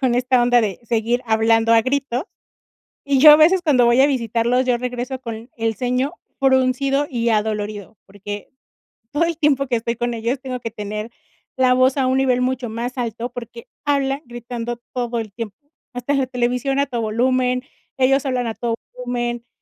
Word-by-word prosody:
con 255 -3 +2
esta 250 0 +2
onda 245 0 +4
de 205 -5 -2
seguir 235 +2 0
hablando 225 +1 +3
a 230 - +6
gritos, 260 +2 -1 0.8
y 280 -1 +2
yo 305 +2 +10
a 300 - +10
veces 350 +4 +5
cuando 275 -7 +4
voy 235 +2 +4
a 275 - +7
visitarlos, 245 -1 0
yo 250 -1 +3
regreso 250 +1 -4
con 230 -1 -7
el 225 -1 -1
ceño 255 +4 -1 0.3
fruncido 270 +1 +2
y 235 -3 -1
adolorido, 210 -1 -2
porque 205 +1 -8 0.6
todo 295 +3 +1
el 335 -2 -2
tiempo 280 -3 +2
que 245 -2 0
estoy 235 +1 -2
con 240 +1 -2
ellos 235 +4 -2
tengo 255 -2 -5
que 230 - -5
tener 210 +1 -5 0.5
la 260 -1 +4
voz 255 +2 +3
a 270 -2 +1
un 260 +1 +2
nivel 255 -2 +2
mucho 255 -1 -1
más 240 +3 -5
alto, 235 0 -3
porque 235 -1 -9 0.2
hablan 275 -1 +1
gritando 240 0 -5 0.2
todo 240 -2 -2
el 220 -3 -5
tiempo, 215 -2 -6 0.4
hasta 245 +3 -2
la 270 -2 +1
televisión 250 +2 -1
a 280 - +2
todo 240 - -3
volumen, 250 +3 +1 0.3
ellos 270 +1 +2
hablan 250 -2 -1
a 225 - -3
todo 235 0 -2 0.2
volumen, 240 -1 -3
245 Hz, 185 wpm, -20 LUFS, 230-260 Hz, 0.8 s, yo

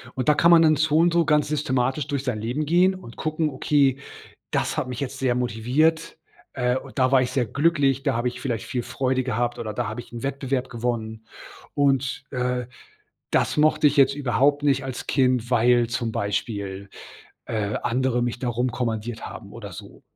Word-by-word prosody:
und 130 -2 -3
da 150 - +6
kann 170 +4 +4
man 170 -1 +8
dann 155 -1 +5
so 155 +1 +2
und 170 +1 +4
so 170 0 +4
ganz 150 -1 +2
systematisch 135 -2 -1
durch 140 -2 -3
sein 125 -5 -1
Leben 125 +7 -2
gehen 180 +5 +4
und 150 -11 -11
gucken: 155 0 -1
„Okay, 135 -1 +2 0.6
das - - 0
hat - - -1
mich 125 -2 -5
jetzt 135 0 -4
sehr 130 -2 +1
motiviert. 125 +8 0 0.3
Äh, 125 -1 0
und 130 - -7
da 130 0 +4
war 135 -1 +5
ich 125 0 -1
sehr 130 -2 +1
glücklich. 140 -2 +1
Da - - +1
habe 120 +2 0
ich 125 0 -7
vielleicht 115 -7 -3
viel 125 -3 -3
Freude 130 -1 -1
gehabt, 120 -1 -1
oder 110 -2 -4
da - - -2
habe 110 +3 -5
ich 120 - -14
'n 115 - -7
Wettbewerb 135 -2 -2
gewonnen. 110 -2 -4 0.5
Und, 135 -2 +1
äh, 125 -1 -2 0.6
das - - +1
mochte 155 0 +4
ich 145 +1 +3
jetzt 135 -1 +5
überhaupt 140 +1 +1
nicht 135 -2 +2
als 130 -2 -6
Kind, 125 -3 +1
weil 120 0 +4
zum 120 -1 -2
Beispiel, 100 -1 -3 0.5
äh, 105 -2 -2
andere 125 0 +1
mich 120 0 -2
da 125 - -2
rumkommandiert 120 -2 -2
haben 100 - -10
oder 105 -4 -8
so.“ - - -11
130 Hz, 195 wpm, -24 LUFS, 120-145 Hz, 0.6 s, man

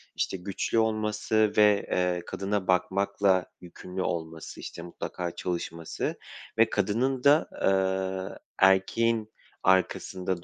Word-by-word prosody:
işte, - - -1
güçlü 95 +4 -2
olması 110 -1 +1
ve, 105 -1 +5
eee, 90 -1 +1
kadına 100 -1 -2
bakmakla 95 +1 +2 0.2
yükümlü 90 +1 -7
olması, 80 -2 -4
işte, - - -7
mutlaka 85 0 -5
çalışması 85 -2 -4 0.4
ve 115 0 +5
kadının 120 +6 0
da, 145 +3 +5
eee, 95 0 0 0.2
erkeğin 110 +4 +3 0.3
arkasında 95 -1 +1
95 Hz, 105 wpm, -28 LUFS, 90-105 Hz, 0.4 s, ve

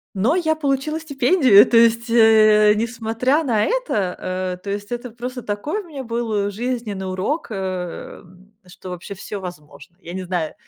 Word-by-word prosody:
Но 230 - +2
я 315 -3 +1
получила 295 +1 -1
стипендию. 280 - +5
То 235 - +2
есть, 230 0 +4
э, 215 -2 +6
несмотря 230 +6 0
на 225 -6 +1
это, - - -1 0.3
э, 185 0 -3
то 200 - -6
есть, 205 +2 -5
это 240 +1 -4
просто 250 +2 -6
такой 260 - -3
у - - -16
меня 280 -4 -7
был 225 -4 -2
жизненный 215 -4 -4
урок, 190 - -2
эм, 185 0 -7
что 180 +1 -11
вообще 180 +3 -7
всё 200 +1 -7
возможно. 175 -1 -11
Я 170 - -9
не 190 0 -4
знаю, 175 -3 -3
220 Hz, 165 wpm, -21 LUFS, 190-255 Hz, 0.3 s, э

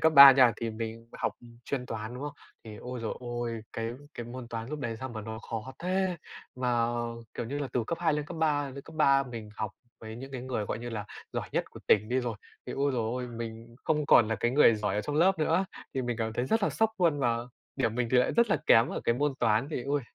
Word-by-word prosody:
cấp 160 - +4
3 140 -1 +13
nha, 130 -3 +6
thì 115 -1 -3
mình 115 +1 -6
học - - 0 0.3
chuyên 130 -1 -3
toán, 110 +1 -5
đúng 125 - -6
không? 145 0 -4 0.3
Thì, 110 -2 -9
ôi 125 +2 -6
giời 115 - -2
ôi, 120 -2 -3
cái 115 0 -2 0.2
cái 120 - -6
môn 120 0 -7
toán 115 0 -5
lúc 150 +1 -4
đấy 115 -3 -3
sao 130 - -4
mà 115 -3 -6
nó 110 +1 -6
khó 115 +3 -4
thế, 185 0 0 0.4
mà, 120 -2 +1 0.5
kiểu 120 - -3
như 140 +5 -3
là, 145 -2 -3
từ 120 - 0
cấp 170 - -2
2 170 -2 +3
lên 150 0 -1
cấp - - -7
3, 150 -2 +2
lên 140 +1 -8
cấp 160 - -12
3 140 -3 +5
mình 115 -4 -7
học 110 -2 -2 0.3
với 110 0 -8
những 135 +3 -9
cái 130 -2 -5
người, 125 -4 -2
gọi 105 - -3
như 120 +1 -6
là, 105 -3 -4 0.3
giỏi - - -3
nhất - - +1
của - - -11
tỉnh 105 +1 +5
đi 130 +1 +1
rồi, 120 -2 -2 0.3
thì, - - -4
ôi 140 0 +1
giời 120 -3 0
ơi, 125 +3 -2
mình 115 0 -7
không 150 -2 +1
còn 115 -5 +6
là 110 - +1
cái 120 - +2
người 130 -3 +6
giỏi 105 -2 -1
ở 105 - +1
trong 145 +7 -3
lớp 185 +3 +4
nữa. 165 +4 +2 0.3
Thì 130 - 0
mình 120 -1 -2
cảm 110 -1 -1
thấy 120 - -1
rất 225 +9 +2
là - - +2
sốc 220 0 +2
luôn 165 -5 +3
và 120 -3 +2 0.4
điểm 115 -5 +1
mình 120 -1 0
thì 130 - +6
lại 125 - +3
rất 235 -2 +3
là - - +4
kém 115 +2 +6
ở - - -3
cái 115 - +3
môn 145 +3 +1
toán, 115 +3 +2
thì, 140 - -2
ôi, 145 +1 +1
125 Hz, 270 wpm, -29 LUFS, 115-145 Hz, 0.5 s, 3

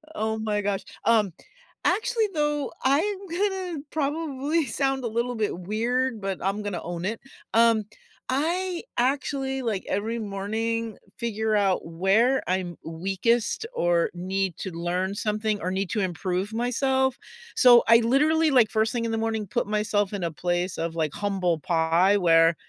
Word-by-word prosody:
Oh 220 -6 -1
my 210 -1 -1
gosh, 200 -1 -1 0.2
um, 215 -5 +3 0.5
actually 445 +4 +1
though, 295 -3 0
I'm 385 +9 +1
gonna 375 -1 -2
probably 300 0 -1
sound 270 +1 -1
a - - -1
little 235 +2 -1
bit 215 -5 -1
weird, 230 +5 -1
but 195 -1 -2
I'm 195 +3 -1
gonna 200 -4 -3
own 170 0 -5
it. 220 +4 -2 0.3
Um, 230 -1 +4 0.5
I 340 +6 0 0.2
actually, 270 +1 0
like, 220 -6 -2
every 225 +3 -1
morning, 220 +2 -3 0.2
figure 220 -1 -1
out 195 -3 +2
where 195 +10 +2
I'm 180 -1 -1
weakest 195 - 0
or 175 -1 +2
need 190 0 -2
to 190 - -4
learn 175 +3 -2
something 210 0 -1
or 180 - -1
need 190 0 -2
to 220 - 0
improve 185 +2 -2
myself. 265 +2 +1 0.4
So, 240 -2 +7
I 230 0 +8
literally, 300 +7 +3
like, 245 -5 +5
first 220 0 +1
thing 235 -1 -1
in 230 - -1
the 225 - -1
morning, 220 -2 -2 0.2
myself 210 -1 0
in 200 -3 -3
a 170 - -1
place 175 +3 -2
of 165 0 -3
like 155 -3 -1
humble 190 -5 0
pie 165 +5 +3
where 165 -2 +5
220 Hz, 155 wpm, -25 LUFS, 190-265 Hz, 0.5 s, I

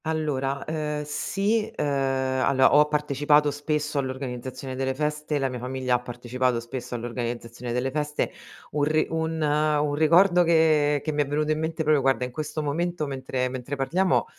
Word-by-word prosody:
Allora, 140 -4 -1
uhm, 150 -1 -2
sì, 200 +8 -1
uhm, - - 0
allora 130 -1 +2
ho 150 +1 +6
partecipato 150 0 +2
spesso 150 0 -2
all'organizzazione 130 -1 -5
delle 130 0 -1
feste, 150 +1 -1
la 135 -1 0
mia 125 -1 -5
famiglia 130 0 -2
ha 125 - +3
partecipato 125 0 -2
spesso 125 +1 -6
all'organizzazione 120 0 -5
delle 125 +2 -1
feste. 150 +1 -1 0.4
Un 145 -1 0
ri 155 +1 +2
un 160 0 -1
un 150 0 +2
ricordo 175 +4 +5
che 155 -3 +3
che 155 - -1
mi 150 0 +1
è 145 - -1
venuto 150 +2 0
in 155 - 0
mente 160 0 -2
proprio, 150 -2 +3
guarda, 135 -1 +2
in 125 - -7
questo 155 +2 -4
momento, 170 +2 -1
mentre 130 -2 -2
mentre 130 +2 -5
parliamo, 170 +7 +1
145 Hz, 165 wpm, -25 LUFS, 130-155 Hz, 0.4 s, ho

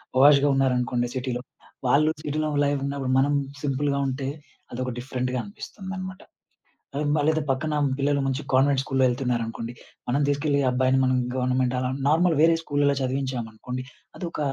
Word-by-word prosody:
పాష్‌గా 140 +2 +6
ఉన్నారనుకోండి 125 -2 +1
సిటీ‌లో. 125 -1 -2 0.5
వాళ్లు 150 +4 +4
సిటీ‌లో 155 +1 -1 0.2
లైఫూన్నప్పుడు. 140 -2 -1
మనం 145 +2 +3 0.3
సింపుల్‌గా 140 0 0
ఉంటే 135 +1 -3 0.4
అదొక 130 +1 -3
డిఫరెంట్‌గా 125 0 -2
అనిపిస్తుందన్నమాట. 190 -2 -7 0.7
ఆ - - -1 0.2
అదే 155 +1 +2
పక్కన 150 +4 -1 0.2
పిల్లలు 140 0 +1
మంచి 135 +1 -1
కాన్వెంట్ 135 +1 +4
స్కూల్‌లో 135 0 +1
ఎళ్తున్నారనుకోండి. 120 -2 -2 0.4
మనం 140 +4 +2
తీసుకెళ్లి, 145 0 +1
ఆ - - +4
అబ్బాయిని 130 +1 +2
మనం 130 0 +2 0.2
గవర్నమెంట్ 125 0 +1 0.3
నార్మల్ 165 +1 +3
వేరే 165 +1 +6
స్కూలలో 145 -2 +1
చదివించాం 130 -2 -1
అనుకోండి, 125 +3 -6 0.3
అదొక 170 -4 -5
135 Hz, 130 wpm, -25 LUFS, 130-145 Hz, 0.7 s, పాష్‌గా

